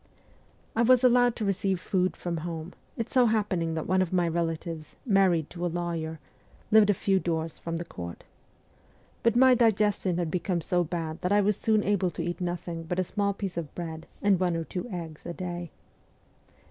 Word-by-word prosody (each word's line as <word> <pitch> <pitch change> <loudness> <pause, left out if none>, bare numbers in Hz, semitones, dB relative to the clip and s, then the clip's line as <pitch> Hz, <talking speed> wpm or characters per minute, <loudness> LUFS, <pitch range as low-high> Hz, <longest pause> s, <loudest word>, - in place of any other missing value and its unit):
I 230 - +2
was 250 +1 +5
allowed 245 -1 +5
to 220 - -3
receive 195 -1 0
food 185 0 0
from 175 -1 -3
home, 165 +1 -5 0.2
it 230 - -3
so 250 -2 +5
happening 190 -7 0
that 160 - -2
one 185 +1 +2
of 185 - -1
my 180 -2 +2
relatives, 165 -1 -3
married 190 - +3
to 175 0 -6
a 175 - +1
lawyer, 165 -2 -3 0.5
lived 215 -1 +6
a 205 - +4
few 195 +1 +2
doors 165 -2 -2
from 165 0 -4
the 170 - -5
court. 85 - -8 1.0
But 230 -1 +2
my 260 +1 +7
diges 215 -3 +3
tion 180 -3 0
had 170 -3 -1
become 180 0 0
so 175 +2 +1
bad 165 -1 -4
that 180 - -1
I 205 0 +5
was 205 +1 +2
soon 215 0 +2
able 195 -3 +1
to 170 - -5
eat 175 +2 -4
nothing 175 -1 -3
but 170 +2 -4
a 185 - +2
small 200 +2 -1
piece 195 -4 -5
of 160 -4 -5
bread 165 -2 -6 0.2
and 200 -3 +4
one 180 -2 +1
or 165 - -1
two 180 +7 -5
eggs 165 -5 -7
a 175 - -4
day. 175 -1 -5
180 Hz, 200 wpm, -28 LUFS, 165-205 Hz, 1.0 s, my